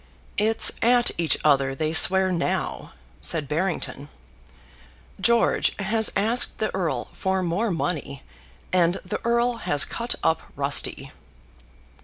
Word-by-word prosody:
"It's 220 +1 +5
at 240 +1 +3
each 165 -2 +3
other 135 -2 +2
they 155 +3 -3
swear 190 +3 +6
now," 175 -1 -3 0.3
said 155 -4 +1
Barrington; 150 -3 -3 1.1
"George 235 0 +1
has 215 +2 0
asked 225 +5 +2
the 215 - -3
Earl 160 -10 -3
for 190 0 -2
more 185 +7 -1
money, 160 -6 -4 0.5
and 175 -1 +2
the 180 - -5
Earl 235 +1 0
has 145 -10 +1
cut 235 +1 -3
up 160 - +1
rusty." - - -2
185 Hz, 120 wpm, -23 LUFS, 160-225 Hz, 1.1 s, swear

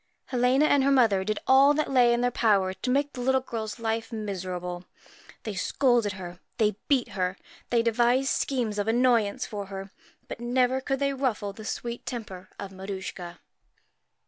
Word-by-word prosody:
Helena 255 +3 +3
and 285 -2 +4
her 275 - +3
mother 230 -8 +4
did 215 +1 -2
all 275 +3 +6
that 305 -2 -1
lay 245 -2 +5
in 235 0 +1
their 245 0 +1
power 200 -6 +2
to 190 +7 -5
make 285 +3 +1
the 250 - -6
little 265 +1 +3
girl's 225 -4 -5
life 225 0 -2
miserable. 180 -4 -5 0.6
They 215 - -4
scolded 235 +1 +1
her, 180 -2 -8 0.2
they 215 -3 +2
beat 270 -4 +2
her, 185 0 -2 0.3
they 235 -1 +2
devised 240 +3 +2
schemes 235 -6 -1
of 205 - -1
annoyance 230 -3 +2
for 205 -2 -6
her, 195 0 -7 0.4
but - - -7
never 250 +2 +1
could 270 0 -1
they 275 0 0
ruffle 230 -7 -2
the 215 +1 -10
sweet 235 +1 -4
temper 190 -6 -6
of 195 - -7
Maruschka. 190 -3 -7
230 Hz, 170 wpm, -27 LUFS, 195-255 Hz, 0.6 s, all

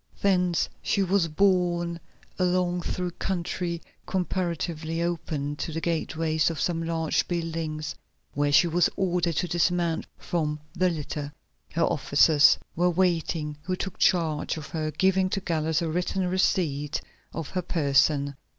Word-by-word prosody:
Thence 180 -3 +2
she 200 - +1
was 190 -2 +2
borne 175 -1 +1 0.4
along 180 -1 +1
through 180 +1 -3
country 175 -1 -3 0.2
comparatively 170 -3 -2
open, 155 -4 -2
to 165 - -3
the 160 - -2
gateways 160 -1 0
of 165 - -4
some 170 -2 0
large 165 -1 0
building, 165 -3 -3 0.5
where 145 +1 +1
she 145 - +6
was 170 +1 +3
ordered 180 -3 0
to 180 - 0
dismount 175 -1 +1
from 150 -3 -2
the 185 0 +2
litter. 150 -3 -4 0.4
Here 165 - 0
officers 145 +1 +5 0.2
were 175 +2 +3
waiting 165 -4 0
who 185 +4 -2
took 190 +1 -5
charge 165 -3 +2
of 155 -2 -7
her, 155 -1 -2
giving 190 +3 +2
to 195 - -1
Gallus 160 -3 0
a - - -1
written 180 +3 -1
receipt 155 -6 +1 0.3
for 165 - -4
her 180 +5 -3
person. 140 -3 +2
170 Hz, 140 wpm, -26 LUFS, 155-180 Hz, 0.5 s, she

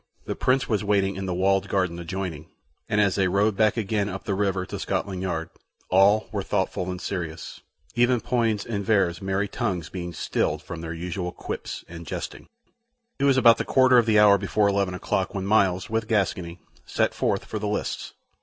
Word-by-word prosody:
The - - -3
Prince 130 +1 +1
was 105 -3 0
waiting 100 -2 +1
in 95 0 -4
the 90 - -1
walled 95 +1 +2
garden 90 -3 0
adjoining, 85 -3 -5 0.4
and 105 - +1
as 100 -2 +3
they 95 -2 +2
rowed 100 +3 +2
back 110 +2 +2
again 105 -1 0
up 95 -1 -6
the 100 - -2
river 95 -2 0
to - - -6
Scotland 95 -2 -2
Yard, 85 -3 -3 0.4
all 100 +3 +5
were 100 - -2
thoughtful 95 -1 -1
and 90 0 -4
serious, 85 -5 -5 0.3
even 120 0 +3
Poins' 115 -4 0
and 105 -3 -3
Vere's 95 -5 +1
merry 95 +1 -1
tongues 95 -8 -3
being 90 -2 -5
stilled 80 -1 -1
from 85 -2 -7
their 80 -1 -5
usual 90 +2 -4
quips - - -6
and 85 -1 -10
jesting. - - -6 0.7
It 140 - +2
was 135 -2 +4
about 115 -2 +6
the - - +1
quarter 130 -2 +5
of 115 - +1
the 110 -1 +4
hour 105 -1 +6
before 100 +1 +1
eleven 100 -2 0
o'clock 95 +1 -2
when 95 -1 -2
Myles, 95 -3 +2
with 110 0 -2
Gascoyne, 90 -5 -1 0.3
set - - 0
forth - - -1
for 110 - -4
the 105 - -3
lists. 105 - -3
95 Hz, 195 wpm, -25 LUFS, 90-105 Hz, 0.7 s, about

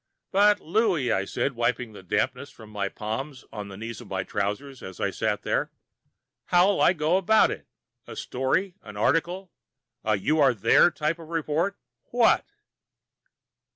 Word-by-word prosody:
"But, 205 +1 +5
Louie," 170 - +1
I 95 -1 +1
said, 140 - -1
wiping 120 -1 -1
the 100 - -11
dampness 125 +9 -1
from 110 -2 -14
my 100 -2 -2
palms 120 +7 -5
on 105 -2 -6
the 100 -1 -9
knees 115 0 -6
of - - -12
my 95 -1 -2
trousers 105 +8 -3
as 95 -1 -9
I - - 0
sat - - -1
there, - - -1 0.7
"how'll 180 +3 +3
I - - +5
go 160 +1 +2
about 215 +3 +4
it? - - -7 0.4
A - - -8
story? 135 +9 -1
An 105 -1 -11
article? 175 - 0 0.5
A 110 0 +2
you 150 +11 +1
are 135 -4 +5
there 115 - +5
type 160 0 -2
of 165 - -10
report? 165 +4 -1 0.3
What?" 240 -1 +3
135 Hz, 160 wpm, -26 LUFS, 110-175 Hz, 0.7 s, But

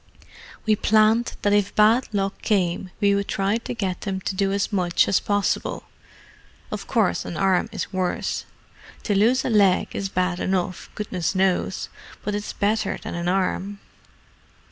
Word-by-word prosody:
"We 215 -1 +4
planned 220 +3 +3
that 205 - +3
if 205 -1 +1
bad 220 +4 +4
luck 195 -2 -2
came 185 -3 0
we 200 -1 +3
would 200 0 0
try 195 +3 0
to 235 - -5
get 190 -5 -2
them 195 -2 -3
to 190 - -3
do 195 0 +1
as 200 +2 -1
much 180 -3 +2
as 195 - +3
possible. 205 -1 -1 0.9
Of 205 -2 -5
course 220 -6 +1
an 170 - -6
arm 195 +3 +2
is 210 - -5
worse: 185 -1 -1 0.6
to 210 - 0
lose 230 +6 +3
a - - 0
leg 200 -4 +4
is 195 -1 -2
bad 180 -1 0
enough, 185 -1 -2
goodness 185 -4 -2
knows—but 190 +2 -2
it's 205 0 -3
better 210 0 0
than - - -7
an 170 0 -3
arm." 195 +2 -1
200 Hz, 160 wpm, -23 LUFS, 185-210 Hz, 0.9 s, We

